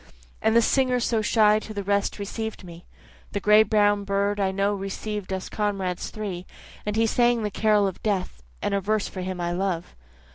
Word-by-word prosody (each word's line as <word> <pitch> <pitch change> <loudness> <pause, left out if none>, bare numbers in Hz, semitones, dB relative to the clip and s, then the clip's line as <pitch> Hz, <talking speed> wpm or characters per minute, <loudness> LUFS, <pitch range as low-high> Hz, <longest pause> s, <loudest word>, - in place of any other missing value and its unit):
And 220 +1 +2
the 235 - +6
singer 255 0 +2
so 230 -2 +1
shy 215 0 +4
to 215 0 -9
the 200 - -3
rest 200 +1 0
receiv'd 220 +1 -5
me, 170 -1 -11 0.5
The 205 - 0
gray 210 +2 +6
brown 205 -2 +3
bird 200 +1 0
I 195 -1 +2
know 195 +2 0
receiv'd 195 0 -5
us 190 0 -3
comrades 195 -4 -2
three, 190 -4 -5 0.4
And 210 - -1
he 225 +1 +3
sang 240 0 +2
the 210 - -2
carol 210 0 +3
of 190 -2 -4
death, 190 - -2 0.2
and - - 0
a 200 - +1
verse 215 +1 0
for 185 - -6
him 185 0 -4
I 175 0 -1
love. 180 -1 -2
205 Hz, 195 wpm, -25 LUFS, 190-215 Hz, 0.5 s, the